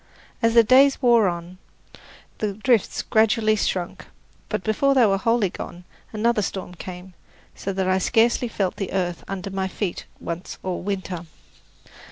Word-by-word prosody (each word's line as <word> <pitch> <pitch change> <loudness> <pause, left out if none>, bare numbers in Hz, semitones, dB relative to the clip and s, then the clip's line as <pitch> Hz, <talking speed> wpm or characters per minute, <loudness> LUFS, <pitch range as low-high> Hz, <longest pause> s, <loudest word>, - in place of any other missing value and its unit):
As 230 0 +2
the 230 - +8
days 270 +4 +5
wore 235 -5 +5
on, 175 +1 -5 0.8
the 210 -2 -1
drifts 220 +1 +1
gradually 220 -1 +3
shrunk, 180 -4 -2 0.4
but - - -2
before 275 +6 +2
they 250 -3 +6
were 195 -2 +2
wholly 230 -3 +1
gone 175 -1 -8 0.3
another 220 0 +1
storm 190 -2 -4
came, 180 +1 -9 0.4
so 195 - -4
that 190 -1 -1
I 185 0 +2
scarcely 235 +4 +2
felt 195 -4 -2
the 195 - -4
earth 175 -3 -2
under 195 0 -5
my 190 0 -1
feet 190 -1 -4
once 170 +1 -6
all 185 -1 -3
winter. 185 -3 -4
195 Hz, 155 wpm, -23 LUFS, 185-230 Hz, 0.8 s, the